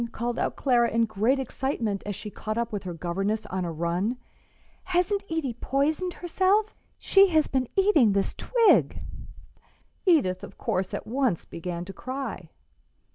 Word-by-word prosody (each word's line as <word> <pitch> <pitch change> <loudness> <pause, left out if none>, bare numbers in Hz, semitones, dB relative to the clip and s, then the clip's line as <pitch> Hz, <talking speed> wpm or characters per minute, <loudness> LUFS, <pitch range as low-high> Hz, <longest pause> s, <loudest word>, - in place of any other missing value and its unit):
called 240 +1 -3
out - - -1
Clara, 240 -3 +3
in 230 0 +2
great 220 +5 +1
excitement, 250 -5 -2
as 205 - -3
she 210 +2 -7
caught 215 +2 -4
up 235 0 -1
with 205 -2 -4
her 180 - -4
governess 195 +6 -2
on 185 0 -3
a 170 - -3
run; 175 +9 -1 0.7
"hasn't 370 +2 +1
Edie 320 -6 -1
poisoned 295 +9 0
herself? 380 +5 +1 0.2
She 395 0 +5
has 315 -4 +3
been 260 -2 -1
eating 330 - +4
this 195 0 0
twig." 470 -3 +3 1.1
Edith, 185 - +3
of - - -10
course, 185 0 -1
at - - -6
once 240 - 0
began 170 +1 -5
to 195 - -8
cry. 255 - -5
235 Hz, 155 wpm, -26 LUFS, 195-310 Hz, 1.1 s, She